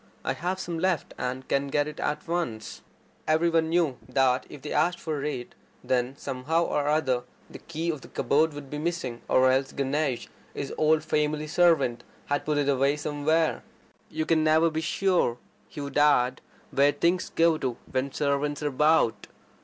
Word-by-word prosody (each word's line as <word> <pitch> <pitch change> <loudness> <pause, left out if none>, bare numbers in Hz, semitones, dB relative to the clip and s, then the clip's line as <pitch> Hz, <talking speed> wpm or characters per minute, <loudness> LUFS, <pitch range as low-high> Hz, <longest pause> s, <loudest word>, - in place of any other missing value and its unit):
I - - +1
have 180 +3 -3
some 170 -3 -4
left, 180 -3 0
and 130 +1 -4
can 140 0 0
get 145 +1 0
it 150 - -8
at 150 +2 -2
once." 165 -11 -3 0.5
Every 160 +2 +3
one 165 -1 +2
knew, 165 -6 +1
that, 130 -1 +2
if 145 - -11
they 150 - -4
asked 175 0 +1
for 150 -3 -3
it, 130 -5 -4 0.3
then 125 +1 0
somehow 150 +6 -1
or 145 -3 -1
other 140 -5 +1 0.3
the - - -9
key 170 +1 -3
of 150 -4 -7
the - - -12
cupboard 150 +4 +1
would 140 -2 -9
be 150 - -4
missing; 155 -7 -3
or 130 0 +4
else 135 +1 +1
Ganesh, 140 -1 -1 0.3
his 140 - -4
old 155 0 +3
family 150 -1 0
servant, 155 -6 +2 0.2
had 145 0 -1
put 150 -1 0
it 145 -1 +1
away 140 +1 +2
somewhere. 150 +2 0 0.5
"You 155 0 -2
never 160 0 +3
can - - -12
be 160 - -1
sure," 175 -8 +1 0.3
he 150 - -7
would 140 +1 -2
add, 130 -4 +3 0.3
"where 140 +1 +4
things 175 +5 +1
go 165 -1 +3
to 125 -5 -2
when 130 +1 -1
servants 145 +1 -1
are 145 - +1
about. 150 -4 +2
150 Hz, 180 wpm, -27 LUFS, 135-160 Hz, 0.5 s, or